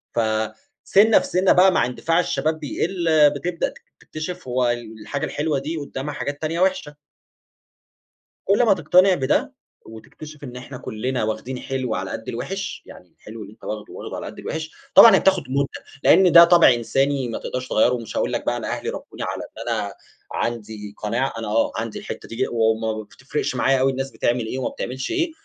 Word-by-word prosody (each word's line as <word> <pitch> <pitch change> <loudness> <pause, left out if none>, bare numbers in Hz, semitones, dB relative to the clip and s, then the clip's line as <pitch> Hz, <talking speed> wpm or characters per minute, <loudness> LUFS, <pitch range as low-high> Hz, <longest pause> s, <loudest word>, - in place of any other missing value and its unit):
فَسِنّة 110 - +2
في - - -5
سِنّة 185 +1 +3
بقى 185 +1 +6
مع 115 - +2
اندفاع 165 +7 0
الشباب 155 -1 0
بيقل، 170 +4 -2
آآ، 155 -2 +6
بتبدأ 165 +4 -2
تك - - -17 0.2
تكتشف 175 +1 -7
هوالحاجة 120 0 -2
الحلوة 150 -2 -1
دي 155 +4 -4
قدامها 145 0 -5
حاجات 145 0 -5
تانية 160 +2 -2
وحشة. 185 -6 0 1.5
كل 205 +5 +3
ما 215 - +5
تقتنع 180 +2 +4
بده، 130 -4 0 0.3
وتكتشف 145 +7 -12
إن 125 -2 -8
إحنا 125 +1 -8
كلنا 125 +3 -3
واخدين 110 +4 -3
حلو 130 -4 -3
على 95 +2 -4
قد 110 - -6
الوحش، 195 +12 -5
يعني 90 -2 -15
الحلو 110 +1 -10
اللي 100 - -12
أنتَ - - -26
واخده، 105 0 -6
واخده - - -7
على - - -6
قد - - -9
الوحش. 160 0 -5 0.2
طبعًا 225 -4 +10
هي - - +4
بتاخد 190 -4 +2
مدة؛ 140 0 -3
لإن 185 -2 +6
ده 170 0 +10
طابع 170 -6 +6
إنساني 135 +2 0
ما 115 - -3
تقدرش 130 0 -5
تغيَّره، 120 +3 +3
ومش 115 -3 -5
هأقول - - 0
لك - - -2
بقى - - 0
أنا - - -5
أهلي - - -3
ربوني - - -7
على - - -4
إن - - -8
أنا - - -3 0.4
عندي 110 -3 -4
قناعة، 115 +5 -1
أنا 115 - -5
آه 110 +2 +1
عندي 115 0 -4
الحتة - - -8
دي، 125 +3 -1
وما 110 -1 0
بتفرقش 125 +4 -4
معايا 135 +1 +2
أوي 135 +1 +3
الناس 135 +1 -4
بتعمل 120 -1 0
إيه 120 - -4
وما 130 - -1
بتعملش 130 +2 -5
ايه، 340 -1 0
135 Hz, 185 wpm, -22 LUFS, 115-160 Hz, 1.5 s, طبعًا